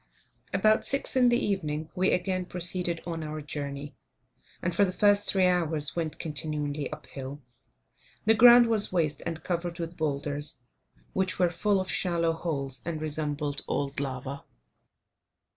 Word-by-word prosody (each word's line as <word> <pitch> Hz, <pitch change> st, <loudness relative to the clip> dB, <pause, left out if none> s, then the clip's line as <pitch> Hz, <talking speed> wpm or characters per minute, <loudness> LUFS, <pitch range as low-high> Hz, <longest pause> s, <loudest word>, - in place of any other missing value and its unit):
About 215 Hz, +3 st, +3 dB
6 275 Hz, -1 st, -1 dB
in 250 Hz, -2 st, +5 dB
the 240 Hz, -, +4 dB
evening 160 Hz, -, -2 dB
we 185 Hz, +1 st, +2 dB
again 185 Hz, 0 st, 0 dB
proceeded 175 Hz, -1 st, -2 dB
on 165 Hz, -1 st, -4 dB
our 155 Hz, 0 st, -4 dB
journey, 145 Hz, -1 st, -6 dB, 0.6 s
and 180 Hz, -, -1 dB
for 200 Hz, -, +5 dB
the 190 Hz, -, +2 dB
first 205 Hz, +1 st, +3 dB
three 190 Hz, -2 st, +4 dB
hours 160 Hz, -5 st, +1 dB
went 165 Hz, -2 st, -2 dB
continually 150 Hz, -1 st, -2 dB
up 150 Hz, -2 st, -8 dB
hill. 135 Hz, +2 st, -8 dB, 0.8 s
The 220 Hz, -, +6 dB
ground 240 Hz, +2 st, +9 dB
was 220 Hz, -3 st, +1 dB
waste 155 Hz, -5 st, 0 dB
and 165 Hz, -1 st, -4 dB
covered 175 Hz, -1 st, -2 dB
with 170 Hz, 0 st, -5 dB
boulders, 145 Hz, -1 st, -2 dB, 0.5 s
which 190 Hz, -1 st, 0 dB
were 180 Hz, -2 st, +3 dB
full 200 Hz, +2 st, +1 dB
of 185 Hz, -, -2 dB
shallow 170 Hz, -2 st, +1 dB
holes, 140 Hz, -6 st, -4 dB
and 165 Hz, -2 st, -3 dB
resembled 150 Hz, -2 st, -2 dB
old 140 Hz, 0 st, -1 dB
lava. 135 Hz, 0 st, -4 dB
165 Hz, 150 wpm, -28 LUFS, 145-185 Hz, 0.8 s, ground